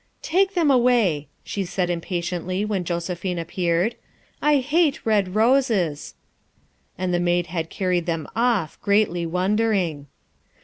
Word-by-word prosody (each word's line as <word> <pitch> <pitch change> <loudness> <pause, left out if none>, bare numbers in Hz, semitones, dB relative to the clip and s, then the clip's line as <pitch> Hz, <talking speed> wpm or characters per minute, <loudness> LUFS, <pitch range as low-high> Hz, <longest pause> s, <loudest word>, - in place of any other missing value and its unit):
" - - -44
Take 380 +3 +1
them 325 -5 +3
away," 235 - +3 0.2
she 200 - -3
said 180 0 -1
impatiently 175 +2 -2
when 205 -4 -1
Jose 170 +1 -2
phine 180 0 -4
appeared, 175 +4 0 0.3
" - - -36
I 295 - +5
hate 295 +3 +1
red 205 -4 +1
roses." 220 - +1 0.8
And 185 -1 -1
the 175 - +2
maid 175 0 +1
had 165 -1 -4
carried 180 -3 -1
them 165 -2 -2
off, 225 -9 0
greatly 200 -4 +1
wondering. 185 -4 0
185 Hz, 140 wpm, -23 LUFS, 175-225 Hz, 0.8 s, I